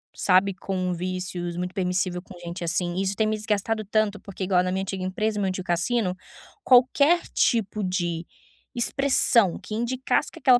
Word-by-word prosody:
sabe, 190 +1 +3
com 185 -1 -2
vícios, 180 -1 -4
muito 180 0 -3
permissível 180 -1 -1
com 185 -1 -13
gente 175 +1 -6
assim, 175 +1 -1
isso 195 +1 -1
tem 220 0 +1
me 215 - 0
desgastado 215 +1 -1
tanto, 215 0 0
porque 195 -1 -7
igual 180 -1 +3
na 185 - -1
minha 190 +1 -1
antiga 195 -1 -4
empresa, 210 +3 -1
meu 195 - +1
antigo 185 0 -3
cassino, 180 +2 0 0.5
qualquer 280 +7 +5
tipo 215 -3 +1
de 175 -2 -2 0.5
expressão 240 -6 +2
que 215 - -9
indicasse 250 +3 0
que - - -12
aquela 250 -2 +5
190 Hz, 170 wpm, -25 LUFS, 180-215 Hz, 0.5 s, qualquer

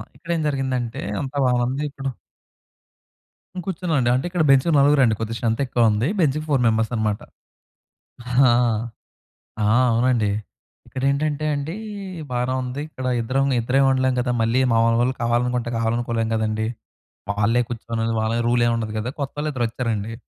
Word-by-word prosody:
ఇక్కడేం 170 -1 -3
జరిగిందంటే, 130 -4 -2 0.2
అంతా 140 +1 -5
బాగుంది 125 +3 0
ఇప్పుడు 135 -1 -5 1.5
హ్మ్. 180 - -3
కూర్చున్నానండి. 160 -9 0
అంటే 130 +7 0
ఇక్కడ 175 -2 0
బెంచ్‌కి 135 +5 +4
నలుగురు 140 0 +5
అండి. 115 -3 +3
కొద్దిగా 115 +1 -3
స్ట్రెంత్ 115 0 -1
ఎక్కువ 120 -2 +3
ఉంది. 110 +7 0
బెంచ్‌కి 155 0 +1
ఫోర్ 135 - +3
మెంబర్స్ 110 0 +2
అనమాట. 105 -1 -1 2.5
ఆ! - - +3 0.2
అవునండి. 115 -2 +2 0.6
ఇక్కడేంటంటే 140 +3 -1
అండి, 145 +6 -4 0.6
బానే 125 +1 0
ఉంది. 125 +3 -4
ఇక్కడ 130 -4 -7 0.2
ఇద్దరం 135 +4 0
ఇద్దరే 125 +4 +1
ఉండలేం 130 -1 +2
గదా! 125 0 0
మళ్ళీ 115 +3 +2
మామూలు 115 0 +3
వాళ్ళు 130 +2 +1
కావాలనుకుంటే 120 0 0
కావాలనుకోలేము 115 0 -1
కదండీ. 110 0 -1 0.6
వాళ్ళే 105 +4 +2
కూర్చొని 115 -1 -3 0.2
వాళ్ళ 115 +2 0
రూల్ 120 0 +3
ఏమి 120 - +2
ఉండదు 110 -1 -4
కదా! 115 +4 -3
కొత్తవాళ్ళు 145 +2 -3
ఇద్దరు 120 -3 0
వచ్చారండి. 115 -2 -3
125 Hz, 140 wpm, -22 LUFS, 115-135 Hz, 2.5 s, నలుగురు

